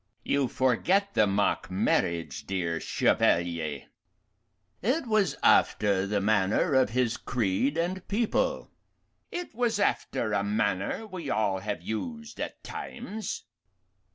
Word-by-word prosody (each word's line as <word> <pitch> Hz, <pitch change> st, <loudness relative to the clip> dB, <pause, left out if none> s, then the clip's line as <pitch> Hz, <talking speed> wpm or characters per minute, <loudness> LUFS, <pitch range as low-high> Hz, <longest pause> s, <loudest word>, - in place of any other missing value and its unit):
"You 140 Hz, -2 st, +1 dB
forget 180 Hz, -, +1 dB
the 105 Hz, -, +4 dB
mock 100 Hz, -2 st, +1 dB
marriage, 85 Hz, -2 st, 0 dB
dear 85 Hz, -4 st, -1 dB
Chevalier." 85 Hz, -4 st, +1 dB, 1.0 s
"It 260 Hz, -, +1 dB
was 215 Hz, -, +2 dB
after 100 Hz, -2 st, +4 dB
the 100 Hz, 0 st, +1 dB
manner 100 Hz, -, +2 dB
of 130 Hz, -4 st, +4 dB
his 120 Hz, 0 st, 0 dB
creed 120 Hz, +6 st, 0 dB
and 180 Hz, +2 st, -2 dB
people." 215 Hz, +2 st, 0 dB, 0.6 s
"It 355 Hz, 0 st, -5 dB
was 235 Hz, -2 st, +1 dB
after 130 Hz, -, 0 dB
a 100 Hz, -1 st, +1 dB
manner 100 Hz, -, -1 dB
we 185 Hz, -8 st, -6 dB
all 100 Hz, -3 st, +1 dB
have 100 Hz, -4 st, -4 dB
used 230 Hz, -, -5 dB
at -, -, -5 dB
times." 220 Hz, -3 st, -6 dB
115 Hz, 120 wpm, -28 LUFS, -, 1.0 s, the